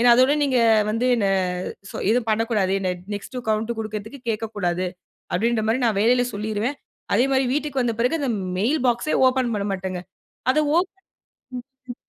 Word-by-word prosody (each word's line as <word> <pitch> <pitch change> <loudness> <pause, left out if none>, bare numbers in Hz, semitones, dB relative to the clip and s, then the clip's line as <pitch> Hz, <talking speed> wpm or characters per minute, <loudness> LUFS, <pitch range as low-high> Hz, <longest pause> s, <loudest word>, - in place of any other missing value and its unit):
ஏன்னா, 240 0 +6
அதோட 255 +2 +5
நீங்க 265 -3 +2 0.3
வந்து 225 +4 0
என்ன 220 -4 +1 0.6
சொ - - -7
எதுவும் 240 0 +2
பண்ணக்கூடாது. 215 -4 +1
என்ன 190 - -2 0.3
நெக்ஸ்ட் 205 +5 -7
கௌவுண்ட் 215 +1 0
கொடுக்குறதுக்கு 215 +4 -5
கேட்கக்கூடாது. 205 -5 -1 0.5
அப்பிடின்றமாரி 225 +4 +1
நான் 220 -4 +2
வேலையில 245 +3 +4
சொல்லிருவேன்.அதே 220 +2 -2
மாதிரி 265 -1 +3
வீட்டுக்கு 290 -2 -1
வந்த 235 -2 0
பிறகு 250 +7 +2
அந்த 275 -4 0 0.3
மெயில் 250 +10 +1
பாக்ஸ்‌ 240 +5 +1
ஏ - - +3
ஓப்பன் 255 -2 0
பண்ணமாட்டங்க. 190 -2 -3 0.5
அத 260 - +2 0.2
ஓப்பன் 370 +2 0 1.0
ம், - - -13
230 Hz, 150 wpm, -23 LUFS, 210-255 Hz, 1.0 s, ஏன்னா